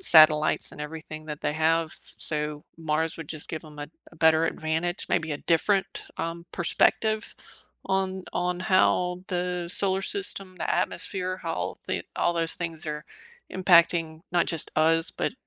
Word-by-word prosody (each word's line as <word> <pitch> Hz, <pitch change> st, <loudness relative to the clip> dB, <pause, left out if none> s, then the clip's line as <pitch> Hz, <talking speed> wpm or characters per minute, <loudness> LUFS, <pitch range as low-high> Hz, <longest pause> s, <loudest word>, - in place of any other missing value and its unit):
satellites 155 Hz, -1 st, +6 dB
and 150 Hz, -, -10 dB
everything 155 Hz, 0 st, -7 dB
that 150 Hz, -1 st, -6 dB
they -, -, +1 dB
have. 160 Hz, +1 st, +2 dB, 0.3 s
So 150 Hz, -1 st, -2 dB
Mars 160 Hz, 0 st, -1 dB
would 160 Hz, -3 st, -8 dB
just 155 Hz, -2 st, -2 dB
give 160 Hz, 0 st, -5 dB
'em 150 Hz, -1 st, -13 dB
a 145 Hz, 0 st, -5 dB, 0.2 s
a -, -, -17 dB
better 160 Hz, 0 st, +5 dB
advantage, 165 Hz, +2 st, -1 dB
maybe 160 Hz, -1 st, 0 dB
a 145 Hz, -, -3 dB
different, 190 Hz, +4 st, +1 dB
um, 170 Hz, +1 st, -4 dB
perspective 215 Hz, +5 st, +1 dB, 0.5 s
on 190 Hz, -1 st, -1 dB
on 180 Hz, 0 st, -1 dB
how 180 Hz, -1 st, +2 dB
the 180 Hz, -1 st, -2 dB
solar 195 Hz, -1 st, +1 dB
system, 195 Hz, -, -4 dB
the -, -, -1 dB
atmosphere, 185 Hz, -1 st, -2 dB
how 165 Hz, -3 st, -3 dB
the -, -, -1 dB
all 175 Hz, -, +2 dB
those 165 Hz, -1 st, 0 dB
things 165 Hz, -1 st, -4 dB
are 150 Hz, 0 st, -4 dB, 0.5 s
impacting, 170 Hz, -3 st, +4 dB
not 175 Hz, -1 st, +3 dB
just 165 Hz, -3 st, -1 dB
us, 165 Hz, +1 st, +4 dB
but, -, -, -2 dB
165 Hz, 155 wpm, -27 LUFS, 155-180 Hz, 0.5 s, satellites